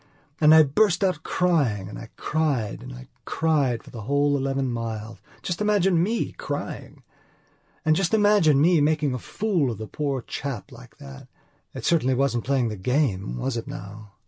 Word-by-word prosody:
And 150 -1 +6
I 160 - +8
burst 190 +7 +2
out 180 -5 +1
crying 145 - 0
and 105 - -8
I 115 - -10
cried 145 -9 -1
and - - -9
I 60 +1 -10 0.2
cried 145 -7 0
for - - -14
the 115 - -8
whole 145 +5 +1
eleven 135 -1 -1
miles. 115 -1 -5 0.2
Just 175 +2 -3
imagine 195 -5 +3
me 220 +6 -1
crying! - - -6 0.8
And 155 0 +4
just 180 0 0
imagine 205 -9 +4
me 165 +1 +4
making 150 -2 +1
a 125 - -3
fool 180 - -1
of 115 - -4
the 110 - -6
poor 140 +2 -3
dear - - -29
chap 135 -7 -5
like - - -14
that. 70 -1 -11 0.5
It - - -6
certainly 130 -6 +2
wasn't 125 -3 0
playing 130 -3 +1
the 105 - -5
game, 100 - 0
was 130 - -2
it 115 - -5
now?" 105 +1 -9
140 Hz, 180 wpm, -24 LUFS, 115-160 Hz, 0.8 s, I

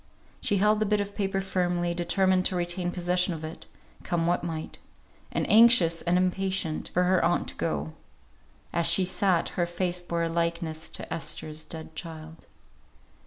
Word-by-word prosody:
She 205 -4 +1
held 210 +2 +3
the 215 - +1
bit 210 0 +2
of 205 0 -3
paper 195 -2 -1
firmly, 175 -2 -1
determined 185 +2 +2
to 185 - -4
retain 175 0 -1
possession 180 0 0
of 160 - -8
it, 155 +1 -8 0.3
come 170 -1 -1
what 175 +1 +1
might; 160 -2 -5 0.5
and - - -1
anxious, 215 -7 +6
and 175 +1 +1
impatient, 185 -3 -1
for 180 - +2
her 185 0 +2
aunt 175 +1 +1
to - - -6
go. 75 +1 -3 0.8
As 170 -1 +4
she 175 +2 +5
sat, 185 -1 +1
her 175 -1 -1
face 175 0 -2
bore 170 -1 -2
a - - +1
likeness 170 -1 -2
to - - -5
Esther's 155 0 -3
dead 160 0 -8
child. 160 -1 -9
175 Hz, 165 wpm, -27 LUFS, 165-185 Hz, 0.8 s, anxious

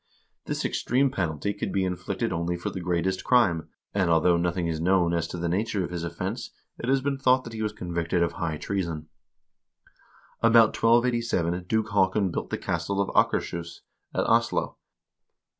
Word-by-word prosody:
This - - -3
extreme 130 +2 +1
penalty 85 - -2
could 100 - -4
be 95 - +1
inflicted 95 +4 -2
only 85 +1 -1
for 85 - -4
the 95 - -5
greatest 90 +2 -1
crime, 95 -11 +3 0.2
and 95 -4 +1
although 85 +1 +4
nothing 85 +1 0
is 80 -1 -2
known 90 -1 +3
as 85 -1 0
to 90 - -6
the 85 0 -2
nature 100 +2 0
of 90 - -5
his 85 -2 -4
offense, 85 -1 -4 0.3
it 120 - -3
has 135 0 +3
been 140 0 -1
thought 130 -1 +4
that 115 - -9
he 110 - -5
was 105 -1 -1
convicted 85 -3 -1
of 85 - 0
high 80 -2 -3
treason. 85 -5 -3 1.3
About 115 -1 +6
1287 115 -7 +2
Duke 110 +3 0
Haakon 95 -1 +2
built - - -4
the - - -2
castle 85 +4 -2
of 100 - +1
Akershus, 85 -1 0 0.3
at - - +1
Oslo. - - +1
90 Hz, 175 wpm, -26 LUFS, 85-110 Hz, 1.3 s, About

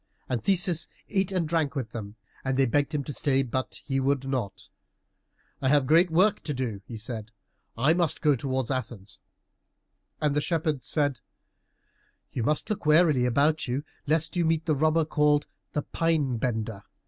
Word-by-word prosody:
And 120 -3 -2
Theseus 180 -4 +3 0.2
ate 195 -2 0
and 180 -4 0
drank 155 -2 0
with 125 -6 -3
them, 105 -2 -7 0.3
and 130 -1 -1
they 135 - +4
begged 145 +5 0
him 145 - -1
to 145 - -6
stay, 135 -1 +1
but 130 +1 -3
he 135 -1 0
would 135 0 0
not. 120 -8 -3 0.9
"I 130 - +2
have 145 0 +4
a - - -5
great 165 +6 +5
work 185 +6 +3
to 150 - -2
do;" 115 -6 -3
he 115 - -7
said, 110 -1 -6 0.5
"I 135 +7 +4
must 170 -3 +1
go 150 -3 +3
towards 130 0 -2
Athens." 115 -6 -5 1.0
And 150 -2 +1
the 150 - +1
shepherds 155 -4 -1
said, 145 -5 +1 1.1
"You 125 - -3
must 150 +7 0
look 210 -7 -3
warily 155 -5 +5
about 145 +6 +2
you, 130 +4 -2 0.2
lest 160 +2 +1
you 175 - +2
meet 160 0 +1
the 160 - +2
robber, 155 +2 +2
called 150 -1 +2 0.3
the 150 - -1
Pine 155 -7 0
bender. 110 -3 -2
145 Hz, 175 wpm, -27 LUFS, 125-160 Hz, 1.1 s, great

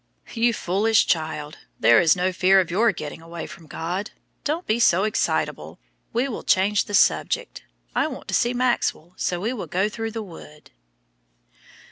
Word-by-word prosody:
"You 235 +1 +2
foolish 215 +2 +2
child, 155 -2 -2 0.2
there 115 - +6
is 165 -3 +4
no 185 +1 0
fear 190 +1 +4
of 180 -3 -1
your 220 +5 +3
getting 155 -3 -7
away 165 0 -7
from 165 - -12
God. 175 +7 -4 0.3
Don't 320 +4 -2
be 220 +2 0
so 190 -5 +4
excitable. 215 - -1 0.3
We 240 +4 0
will 245 - -5
change 200 +2 +2
the 205 - -2
subject. - - +1 0.3
I - - +1
want - - -8
to - - -4
see 240 +1 +2
Maxwell, 240 -8 0
so 175 -1 -2
we 220 +7 -2
will 235 - -6
go 190 +3 0
through 225 +1 -4
the 225 0 -5
wood." 155 -5 -13
195 Hz, 170 wpm, -23 LUFS, 170-225 Hz, 0.3 s, there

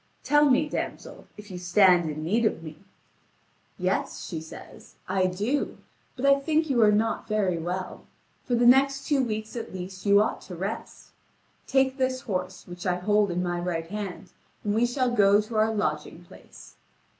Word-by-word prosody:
"Tell 295 0 +4
me, 275 +4 +3
damsel, - - -6
if 210 -1 -11
you 180 - -6
stand 180 -2 +4
in 155 +1 -5
need 215 +9 +1
of 190 -7 0
me." 155 -1 -9 1.0
"Yes," - - -2
she 160 -4 -5
says, 160 - -13
"I 185 0 +1
do; 210 +10 -2 0.4
but 255 - -3
I 275 0 +5
think 315 +1 0
you 240 -3 +3
are 210 -1 +6
not 215 +2 0
very 200 -5 0
well. 180 +3 -5 0.4
For 245 - -1
the 240 +1 +2
next 270 +2 +4
two 285 -3 +2
weeks 215 -1 -4
at 230 -5 -6
least 185 +2 -7
you 200 0 +6
ought 215 - 0
to 180 - -9
rest. 195 +6 -6 0.6
Take 265 0 +2
this 260 -1 0
horse, 185 -3 -4
which 175 +1 -7
I 180 - +2
hold 205 +3 +2
in 180 +1 -1
my 175 -1 -2
right 175 -2 -3
hand, 200 -3 -6 0.3
and 205 - 0
we 230 +3 +2
shall 250 0 0
go 205 -3 +5
to 215 +2 -5
our 215 +1 +3
lodging 215 -1 -3
place." - - -16
210 Hz, 180 wpm, -26 LUFS, 180-245 Hz, 1.0 s, are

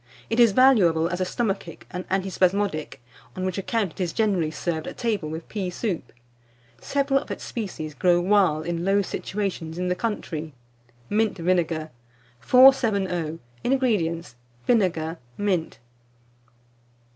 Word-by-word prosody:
It 225 - +1
is 235 -3 +7
valuable 195 -10 +5
as 180 +1 -3
a - - +2
stomachic 195 -5 -3
and 180 +1 -6
antispasmodic; 190 -3 0 0.4
on 185 0 -3
which 185 +1 -2
account 205 -1 -1
it 190 - -8
is 175 -2 -1
generally 195 -8 +1
served 160 +1 -3
at - - -7
table 210 -10 -1
with 160 +1 -6
pea 195 -4 -3
soup. 180 -1 -3 0.7
Several 275 -1 +1
of - - -11
its - - -5
species 185 -9 -5
grow 175 +2 +3
wild 180 -5 +3
in 170 0 -2
low 200 +2 +3
situations 185 -5 -4
in 180 0 -1
the 180 - +1
country. 160 - -4 0.5
MINT 215 0 +1
VINEGAR. 165 -3 0 0.5
470. 200 - +4 0.3
INGREDIENTS. 205 - 0 0.3
Vinegar, 170 -8 +1 0.2
mint. 185 -5 -1
185 Hz, 135 wpm, -25 LUFS, 165-210 Hz, 0.7 s, is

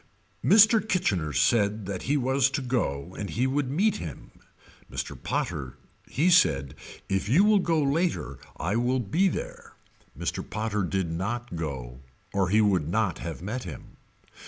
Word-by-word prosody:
Mr. 220 +3 +6
Kitchener 105 - 0
said 105 +3 +2
that 95 -1 -4
he 145 - +3
was 130 0 +2
to 140 0 -3
go 90 - -2
and 100 0 -5
he 125 +3 0
would 135 0 0
meet 195 +9 +1
him. 80 -7 -8 0.6
Mr. - - -4
Potter 65 -4 -3 0.3
he 170 +6 +2
said 70 - +3 0.3
if 95 0 -1
you 160 +11 +5
will 210 -1 +5
go 165 -3 +1
later 140 - 0 0.2
I 95 +7 -1
will 125 +2 +1
be 160 - +1
there. 485 - -5 0.4
Mr. - - -3
Potter 110 -1 -2
did 95 -2 -1
not 115 +7 -3
go 65 -7 -5 0.3
or 95 -2 +1
he 110 +3 +4
would 95 -8 +2
not 100 -3 0
have 85 0 -6
met 115 +6 -3
him. 80 -8 -10
110 Hz, 160 wpm, -27 LUFS, 90-145 Hz, 0.6 s, Mr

